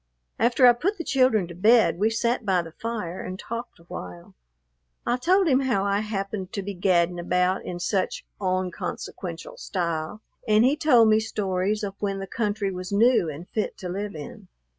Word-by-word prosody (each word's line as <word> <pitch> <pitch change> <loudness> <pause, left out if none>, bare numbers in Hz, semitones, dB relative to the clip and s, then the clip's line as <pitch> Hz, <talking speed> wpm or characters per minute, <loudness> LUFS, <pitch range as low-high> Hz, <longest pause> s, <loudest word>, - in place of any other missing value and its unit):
After 240 +3 +4
I 245 - +9
put 370 - -1
the 335 - -4
children 255 - +2
to 175 - -9
bed, 215 +1 +4
we 215 +2 +3
sat 235 +2 0
by 185 -4 +1
the 165 - -10
fire 210 -3 -5
and 185 0 -6
talked 235 +4 -6
awhile. 90 - -9 0.7
I 240 - +2
told 370 +8 +3
him 265 -4 +4
how 240 -8 +1
I 200 0 +1
happened 195 -2 -4
to 200 - -3
be 200 +1 -4
gadding 175 -1 +2
about 180 +2 +1
in 175 -1 -5
"such 185 +1 -1
onconsequential" 185 - -4
style, 170 - -3 0.2
and 215 +2 +5
he 270 +3 +4
told 250 -7 +5
me 215 0 +5
stories 205 -1 -1
of 200 -1 -3
when 200 -1 -1
the 195 - -4
country 205 -1 -2
was 185 0 -6
new 220 -4 +4
and 155 +4 -8
fit 215 - -3
to 180 - -6
live 200 +2 -4
in. 150 -2 -9
200 Hz, 185 wpm, -25 LUFS, 180-230 Hz, 0.7 s, I